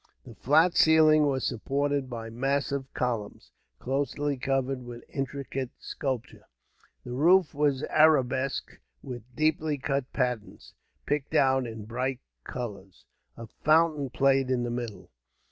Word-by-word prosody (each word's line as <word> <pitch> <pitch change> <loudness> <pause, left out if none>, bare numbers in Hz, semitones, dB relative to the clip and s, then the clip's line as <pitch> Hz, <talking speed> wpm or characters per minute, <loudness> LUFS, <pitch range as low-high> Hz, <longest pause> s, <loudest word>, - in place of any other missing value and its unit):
The 120 - -11
flat 160 +10 +3
ceiling 155 -1 +6
was 135 -2 -1
supported 140 +2 -1
by 115 -2 -6
massive 135 +2 -1
columns, 115 -5 -3 0.3
closely 140 - -1
covered 135 0 -1
with 120 -1 -9
intricate 135 -1 -4
sculpture. 130 -5 -5 0.6
The 125 - -8
roof 170 +7 +4
was 145 -1 +1
arabesqued 135 -4 +2 0.2
with 125 -3 -6
deeply 155 -1 +1
cut 135 -1 -2
patterns, 125 -5 -3 0.3
picked 145 +1 -2
out 130 -3 +3
in 110 -2 -8
bright 125 +3 -2 0.2
colours. 100 -7 -7 0.3
A 115 - -7
fountain 155 +2 +2
played 135 0 +2
in 125 -2 +1
the 120 - -2
middle. 110 - -6
135 Hz, 125 wpm, -28 LUFS, 125-145 Hz, 0.6 s, ceiling